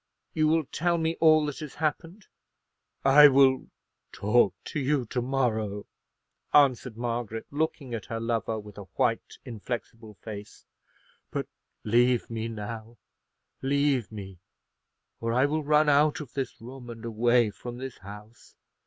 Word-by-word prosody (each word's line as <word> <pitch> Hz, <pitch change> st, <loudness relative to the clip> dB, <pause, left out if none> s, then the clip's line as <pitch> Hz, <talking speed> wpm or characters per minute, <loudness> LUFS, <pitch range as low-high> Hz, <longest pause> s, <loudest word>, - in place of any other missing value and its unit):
"You 155 Hz, -1 st, +2 dB
will 160 Hz, +1 st, +3 dB
tell 170 Hz, +4 st, 0 dB
me 165 Hz, 0 st, 0 dB
all 155 Hz, -1 st, +6 dB
that 145 Hz, 0 st, -5 dB
has 155 Hz, -3 st, -8 dB
happened?" 165 Hz, +5 st, -3 dB, 0.8 s
"I 145 Hz, +2 st, +9 dB
will 135 Hz, -1 st, +4 dB, 0.4 s
talk 105 Hz, -2 st, +2 dB
to -, -, -4 dB
you 135 Hz, -1 st, 0 dB
to 125 Hz, +2 st, -2 dB
morrow," 110 Hz, -6 st, -1 dB, 0.7 s
answered 130 Hz, -5 st, +4 dB
Margaret, 115 Hz, -2 st, -3 dB
looking 145 Hz, -3 st, -2 dB
at 115 Hz, -, -5 dB
her 115 Hz, -, -4 dB
lover 115 Hz, -1 st, -1 dB
with 105 Hz, -1 st, -11 dB
a 100 Hz, -, -8 dB
white, -, -, 0 dB
inflexible 115 Hz, -1 st, -6 dB
face; 105 Hz, +2 st, -10 dB, 0.6 s
"but -, -, -3 dB, 0.4 s
leave 120 Hz, +2 st, +2 dB
me 115 Hz, 0 st, -3 dB
now; 110 Hz, +1 st, -7 dB, 0.6 s
leave 140 Hz, -4 st, +1 dB
me, 95 Hz, -4 st, -9 dB, 0.8 s
or 115 Hz, 0 st, -2 dB
I 130 Hz, +3 st, +4 dB
will 155 Hz, +2 st, -1 dB
run 150 Hz, +1 st, +3 dB
out 145 Hz, +1 st, +4 dB
of 150 Hz, -6 st, -9 dB
this 135 Hz, -3 st, -4 dB
room, 125 Hz, +1 st, -10 dB
and 115 Hz, 0 st, -8 dB
away 115 Hz, 0 st, +2 dB
from 120 Hz, +4 st, -8 dB
this 130 Hz, 0 st, -7 dB
house. 105 Hz, +4 st, -13 dB
120 Hz, 145 wpm, -27 LUFS, 110-145 Hz, 0.8 s, I